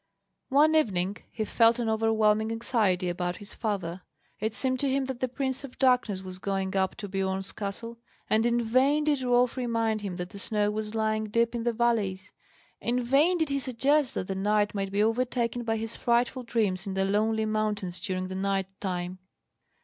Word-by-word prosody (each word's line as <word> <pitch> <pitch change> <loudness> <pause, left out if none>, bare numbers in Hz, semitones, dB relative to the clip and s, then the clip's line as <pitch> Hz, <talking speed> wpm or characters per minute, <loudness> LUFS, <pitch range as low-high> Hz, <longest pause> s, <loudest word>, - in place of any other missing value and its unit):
One 295 +3 +5
evening 200 - +1
he 220 - -3
felt 230 +1 +4
an 240 -2 -1
overwhelming 220 0 +2
anxiety 220 -6 +1
about 175 0 -2
his 205 -1 -9
father. 190 -5 -3 0.4
It 220 +1 -2
seemed 255 -1 0
to 280 - +1
him 270 0 +1
that 260 -2 -5
the 255 - 0
Prince 265 +1 -2
of 270 -2 -10
Darkness 250 -7 +2
was 185 -1 -6
going 195 0 -2
up 190 -1 +1
to 205 - -6
Biorn's 190 0 -1
castle; 230 +3 -6 0.3
and 220 +1 +2
in 240 0 +2
vain 265 +6 +3
did 295 -3 +1
Rolf 245 -1 +2
remind 230 -3 0
him 195 -3 -4
that 180 0 -5
the 200 - -8
snow 210 0 +1
was 215 +1 -4
lying 215 0 0
deep 230 +2 +1
in 235 -1 -3
the 240 - +3
valleys, 215 -5 0 0.5
in 245 +1 0
vain 290 +9 +3
did 320 -3 0
he 275 0 0
suggest 270 +2 +1
that - - -2
the 195 - -2
knight 205 +2 +1
might 195 -1 -2
be 205 +1 +2
overtaken 240 +1 0
by 225 -1 0
his 225 +1 -4
frightful 240 +2 +1
dreams 215 -6 -1
in 190 - -3
the 195 0 +1
lonely 220 +2 +1
mountains 210 -4 -1
during 185 0 -2
the 185 - -6
night 195 0 0 0.2
time. 180 -1 -3
220 Hz, 195 wpm, -28 LUFS, 195-245 Hz, 0.5 s, One